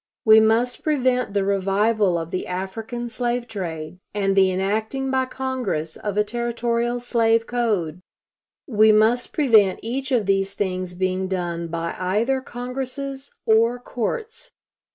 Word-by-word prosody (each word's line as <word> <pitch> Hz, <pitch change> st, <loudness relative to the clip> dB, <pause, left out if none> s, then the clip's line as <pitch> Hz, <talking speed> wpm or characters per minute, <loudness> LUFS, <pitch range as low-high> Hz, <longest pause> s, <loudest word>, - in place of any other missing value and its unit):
We 220 Hz, 0 st, +8 dB
must 225 Hz, +3 st, +2 dB
prevent 255 Hz, -7 st, 0 dB
the 200 Hz, -1 st, +2 dB
revival 200 Hz, 0 st, +2 dB
of 165 Hz, 0 st, -5 dB
the 185 Hz, -, -3 dB
African 220 Hz, +6 st, -4 dB
slave 240 Hz, +1 st, -2 dB
trade, 170 Hz, -5 st, -6 dB, 0.2 s
and 195 Hz, -1 st, +1 dB
the 190 Hz, -1 st, +5 dB
enacting 220 Hz, +8 st, -1 dB
by 260 Hz, 0 st, +2 dB
Congress 255 Hz, -13 st, -3 dB
of 205 Hz, -1 st, -4 dB
a 210 Hz, -, +4 dB
Territorial 235 Hz, +1 st, -1 dB
slave 230 Hz, -2 st, +2 dB
code. 205 Hz, -10 st, -1 dB, 0.6 s
We 215 Hz, -4 st, +5 dB
must 220 Hz, +3 st, +3 dB
prevent 220 Hz, -10 st, +4 dB
each 265 Hz, +4 st, -3 dB
of 235 Hz, -5 st, +2 dB
these 195 Hz, 0 st, 0 dB
things 185 Hz, -3 st, -3 dB
being 185 Hz, +1 st, -1 dB
done 175 Hz, -2 st, -3 dB
by 165 Hz, 0 st, -3 dB
either 220 Hz, +9 st, 0 dB
congresses 265 Hz, +2 st, -6 dB
or 230 Hz, +2 st, +3 dB
courts. 425 Hz, -, -5 dB
220 Hz, 135 wpm, -23 LUFS, 190-245 Hz, 0.6 s, We